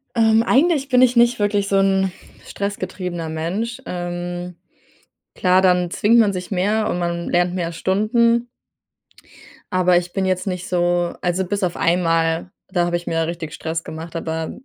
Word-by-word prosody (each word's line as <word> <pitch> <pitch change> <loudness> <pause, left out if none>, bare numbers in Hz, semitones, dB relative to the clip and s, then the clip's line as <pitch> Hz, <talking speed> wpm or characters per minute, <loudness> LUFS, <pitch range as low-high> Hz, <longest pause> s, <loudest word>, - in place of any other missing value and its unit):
Ähm, 225 -1 +4
eigentlich 285 +2 +2
bin 250 -1 +4
ich 250 -1 +4
nicht 235 0 +4
wirklich 205 -1 +1
so 195 - +2
'n 195 -1 +2 0.3
stressgetriebener 185 -4 -4
Mensch. 195 +11 -3
Ähm, 175 0 -5 0.8
klar, 185 -1 +3
dann 180 -2 +3
zwingt 225 +6 +3
man 210 -3 +3
sich 180 +1 -6
mehr 205 +3 +1
und 175 - -1
man 170 0 -2
lernt 175 0 +1
mehr 170 -2 -2
Stunden. 230 +7 +1 1.3
Aber 180 -1 +3
ich 175 0 0
bin 195 0 -1
jetzt 185 +1 -1
nicht 180 -1 -3
so 175 -1 0
also, 180 +1 0
bis 200 +2 -2
auf 175 -2 -1
einmal, 165 0 +1 0.2
da 175 -2 0
habe 175 0 0
ich 175 - -11
mir 165 0 0
richtig 165 -2 -5
Stress 165 0 -4
gemacht, 165 +2 -7
aber 160 0 -3
180 Hz, 165 wpm, -20 LUFS, 175-205 Hz, 1.3 s, Ähm